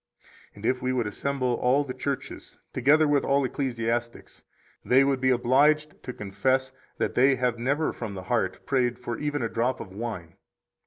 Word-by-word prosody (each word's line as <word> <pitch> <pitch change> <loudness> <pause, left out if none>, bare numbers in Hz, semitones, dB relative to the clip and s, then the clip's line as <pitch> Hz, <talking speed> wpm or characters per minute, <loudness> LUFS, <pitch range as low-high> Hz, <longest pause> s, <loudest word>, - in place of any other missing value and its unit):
And 105 +1 -9
if 130 +2 +1
we 130 0 0
would 120 -3 0
assemble 125 +3 -1
all 135 +4 +3
the 130 -3 -6
churches, 135 +1 -5 0.2
together 150 +5 +4
with 145 -1 +2
all 140 0 +2
ecclesiastics, 120 -3 -3 0.4
they 130 +2 +5
would 135 -1 0
be 130 - +3
obliged 145 +5 +2
to 125 - -6
confess 130 +6 -1 0.3
that - - -1
they 135 +2 +4
have 125 -2 -1
never 140 +6 0
from 110 -4 -6
the 95 - -6
heart 120 +4 -1
prayed 125 -3 +1
for 120 -2 -5
even 145 -3 -2
a - - +1
drop 120 +3 -1
of 95 - -9
wine. 100 -7 -6
125 Hz, 175 wpm, -26 LUFS, 120-140 Hz, 0.4 s, they